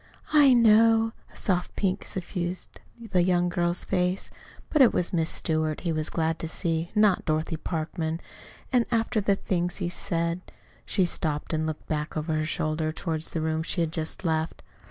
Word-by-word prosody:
"I 285 -4 +7
know." 225 0 +5 0.2
A - - -20
soft 180 -3 -1
pink 195 0 -1
suffused 180 -1 -5 0.3
the 180 - +4
young 175 0 +2
girl's 175 0 0
face. 180 0 -1 0.4
"But 305 - +4
it 250 - +7
was 180 - 0
'Miss 165 -2 +2
Stewart' 155 -1 0
he 170 - -1
was 155 -1 -2
glad 160 -1 -1
to 165 - -3
see, 165 +1 -2
not 210 -3 +4
Dorothy 155 +1 -1
Parkman. 160 0 -3 0.5
And, 245 -2 +3
after 225 -1 +1
the 200 0 +2
things 180 -2 -2
he 175 -3 -2
said 170 -1 -2 0.2
" - - -30
She 190 - +2
stopped 155 -3 -1
and 155 0 0
looked 155 -1 -5
back 150 0 -2
over 155 +1 -1
her 155 0 0
shoulder 155 0 -1
toward 160 -1 -3
the 160 0 -1
room 160 0 0
she 170 - -1
had 165 -2 0
just 160 +3 -3
left. 160 0 -1
170 Hz, 180 wpm, -27 LUFS, 160-190 Hz, 0.5 s, I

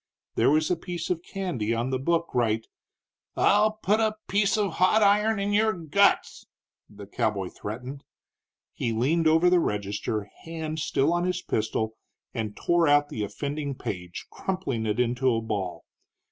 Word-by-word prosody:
There - - +3
was 155 +4 +2
a - - +3
piece 175 0 -5
of 170 -2 -1
candy 170 - -2
on 120 +3 -1
the 130 - 0
book 170 +4 0
right 115 -2 +1 0.4
" - - -67 0.3
"I'll 210 +1 +4
put 215 0 +1
a 220 -1 +1
piece 205 +2 +2
of 205 -3 +1
hot 210 +4 +4
iron 210 +1 +3
in 200 +1 -1
your 220 +1 +3
guts!" 180 +4 +1 0.4
the 100 -1 -11
cowboy 100 -1 -1
threatened. 125 +6 -7 0.7
He 115 - -2
leaned 155 +9 +2
over 160 +3 +4
the 180 0 +5
register, 105 -3 -2 0.2
hand 160 -1 -5
still 145 +1 +1
on 175 0 +1
his 180 0 -1
pistol, 110 0 -2 0.4
and 110 -3 -4
tore 170 -2 +2
out 145 0 +4
the 110 - -3
offending 140 +5 -4
page, 90 -7 -6
crumpling 140 -13 -3
it 105 +3 -1
into 125 +2 +2
a - - +1
ball. 105 -5 -4
150 Hz, 165 wpm, -26 LUFS, 110-180 Hz, 0.7 s, the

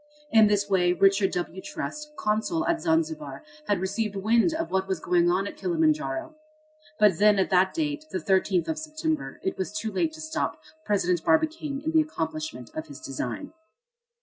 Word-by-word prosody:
In 220 -1 +7
this 205 -1 +1
way 180 -3 +3
Richard 195 +1 +4
W. 180 +1 -3
Trust, 300 +2 -6
consul 220 +11 0
at 340 -1 0
Zanzibar, 320 -2 -1 0.2
had 205 -3 +2
received 200 +3 -2
wind 225 - +3
of 325 +1 -3
what 190 0 0
was 190 -3 -1
going 175 0 +2
on 185 +3 +1
at - - -7
Kilimanjaro. 320 -1 0 0.6
But 210 -5 +4
then 210 0 +5
at 190 - +1
that 185 0 +4
date, 305 -1 -2
the - - -2
13th 185 0 +1
of 315 -1 -2
September, 315 0 -3
it 190 - -2
was 190 - -2
too 215 +1 -3
late 315 - 0
to 315 - -11
stop 315 0 -2 0.3
President 180 -5 +1
Barbicane 315 -3 +1
in 320 - 0
the 320 -1 +5
accomplishment 155 - -4
of 155 0 -5
his 140 -2 -10
design. 125 - -5
210 Hz, 175 wpm, -26 LUFS, 190-315 Hz, 0.6 s, In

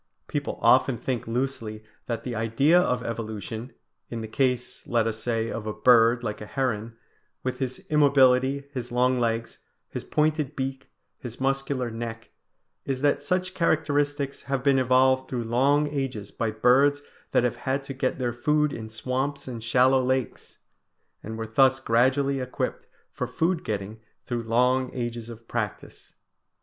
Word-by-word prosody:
People - - -3
often 125 - +5
think 120 0 -3
loosely 115 -3 -3 0.2
that 115 -2 -3
the 125 - -4
idea 115 +10 +3
of 125 -8 0
evolution, 115 +1 -5 0.4
in 115 -1 -4
the 110 - -5
case, 125 +1 -1
let 115 -2 +2
us 110 -1 -2
say, 115 -1 -1
of 110 -1 -5
a 110 - -2
bird 115 +2 +5
like 105 -2 -4
a 105 - -7
heron, 115 -4 -2 0.5
with 130 - -3
his 130 -1 -4
immobility, 140 -2 +4
his 125 -2 -5
long 125 +1 +2
legs, 115 -1 -1 0.3
his - - -5
pointed 150 -1 0
beak, 135 0 -4 0.3
his 120 -4 -8
muscular 135 -2 -1
neck, 115 0 -6 0.5
is 135 -1 -3
that 145 0 +2
such 180 +5 -1
characteristics 145 -4 0
have 135 -2 -2
been 135 -1 +4
evolved 130 +1 +3
through 120 -2 -2
long 135 +6 +2
ages 130 -8 -4
by 115 - -2
birds 135 +6 +3 0.3
that - - +2
have 120 -1 0
had 130 +3 -2
to 135 - -6
get 130 -1 -1
their 125 -2 -1
food 150 +4 +1
in 110 -1 -6
swamps 130 +6 -3
and 120 -3 -6
shallow 130 +3 +4
lakes, 130 -1 -2 0.6
and 110 +1 -6
were 115 - -3
thus 130 +4 +4
gradually 130 +3 +2
equipped 125 0 -3 0.2
for - - -3
food 170 +1 0
getting 105 +1 -4 0.3
through 120 -1 -2
long 125 +3 +2
ages 120 -2 -4
of 115 0 -11
practice. 110 -4 -5
125 Hz, 160 wpm, -26 LUFS, 115-135 Hz, 0.6 s, often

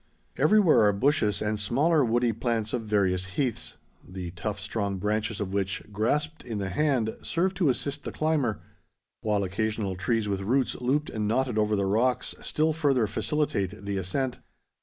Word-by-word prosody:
Everywhere 205 - +5
are 105 - +3
bushes 105 -3 +1
and 105 0 -1
smaller 145 +9 +3
woody 120 0 +2
plants 115 -1 -1
of 125 - 0
various 95 -3 +1
heaths, 130 -6 -1 0.3
the 90 -2 -7
tough 100 +4 -4
strong 100 -1 -2
branches 105 +2 -1
of 100 -2 -3
which, 100 -1 -1
grasped 150 +10 -1
in 115 -4 -4
the 100 -2 -2
hand, 125 -1 +1
serve 185 +3 0
to 175 -6 +2
assist 140 +2 -1
the - - -4
climber, 150 -9 0 0.6
while 105 -2 +1
occasional 105 0 -2
trees 105 +4 0
with 100 -1 -1
roots 125 +6 +1
looped 145 +5 0
and 105 -1 -2
knotted 120 0 +1
over 105 0 +2
the 100 -1 +1
rocks 115 +6 +1
still 155 +1 +1
further 140 -7 +2
facilitate 105 -5 -1
the 100 -1 -2
ascent. 125 +8 -2
110 Hz, 165 wpm, -27 LUFS, 100-135 Hz, 0.6 s, Everywhere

